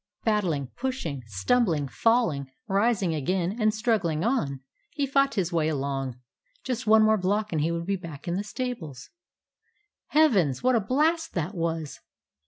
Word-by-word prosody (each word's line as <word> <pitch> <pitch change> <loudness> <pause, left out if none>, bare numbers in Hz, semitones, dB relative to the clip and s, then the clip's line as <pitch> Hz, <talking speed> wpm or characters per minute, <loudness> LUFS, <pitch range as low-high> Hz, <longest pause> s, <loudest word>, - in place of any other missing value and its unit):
Battling, 175 - 0
pushing, 255 - -3
stumbling, 150 - +1
falling, 160 - +1 0.2
rising 195 -3 +1
again 175 +6 -1
and 215 0 +4
struggling 210 -8 0
on, 150 - 0 0.3
he 295 -4 -2
fought 275 -1 +2
his 180 -4 -1
way 160 -2 +2
along. 135 -3 -3 0.4
Just 250 -2 -3
one 220 0 +6
block 205 +3 0
more, - - -2
and 155 - +1
he 160 +3 +1
would 170 0 -3
be 195 +1 0
back 165 -5 -10
in 170 - 0
the 200 - -1
stables. 205 - -6 1.0
Heavens! 200 - +3
What 255 0 +4
a 235 - +4
blast 310 - +1
that 170 +3 -2
was! 165 -4 -3
190 Hz, 155 wpm, -26 LUFS, 155-235 Hz, 1.0 s, one